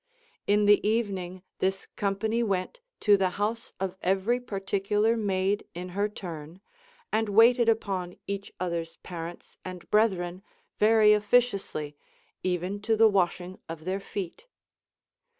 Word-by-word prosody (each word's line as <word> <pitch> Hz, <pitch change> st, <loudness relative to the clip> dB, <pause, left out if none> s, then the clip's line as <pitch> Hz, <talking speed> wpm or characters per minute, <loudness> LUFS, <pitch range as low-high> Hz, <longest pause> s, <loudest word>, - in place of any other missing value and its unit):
In 205 Hz, +1 st, +4 dB
the 205 Hz, 0 st, +6 dB
evening 190 Hz, -5 st, -2 dB, 0.2 s
this 190 Hz, +1 st, 0 dB
company 215 Hz, +3 st, 0 dB
went 195 Hz, -, -1 dB, 0.2 s
to 205 Hz, -1 st, +6 dB
the 190 Hz, -1 st, +2 dB
house 220 Hz, +3 st, -2 dB
of 190 Hz, -1 st, -2 dB
every 195 Hz, +6 st, +1 dB
particular 205 Hz, 0 st, 0 dB
maid 200 Hz, -2 st, 0 dB
in 180 Hz, +1 st, -5 dB
her 200 Hz, +3 st, -1 dB
turn, 170 Hz, -4 st, -8 dB, 0.5 s
and 220 Hz, -1 st, +1 dB
waited 230 Hz, +3 st, +6 dB
upon 190 Hz, -5 st, -1 dB
each 200 Hz, 0 st, -5 dB
other's 170 Hz, -2 st, -3 dB
parents 170 Hz, -1 st, -8 dB
and 185 Hz, -1 st, -8 dB
brethren 185 Hz, -4 st, +2 dB, 0.4 s
very 215 Hz, 0 st, +6 dB
officiously, 205 Hz, -9 st, +1 dB, 0.5 s
even 185 Hz, +2 st, -2 dB
to 220 Hz, +1 st, +1 dB
the 225 Hz, +1 st, +7 dB
washing 185 Hz, -2 st, 0 dB
of 165 Hz, -1 st, -7 dB
their 190 Hz, +2 st, -1 dB
feet. 195 Hz, -, -6 dB
195 Hz, 130 wpm, -28 LUFS, 180-215 Hz, 0.5 s, the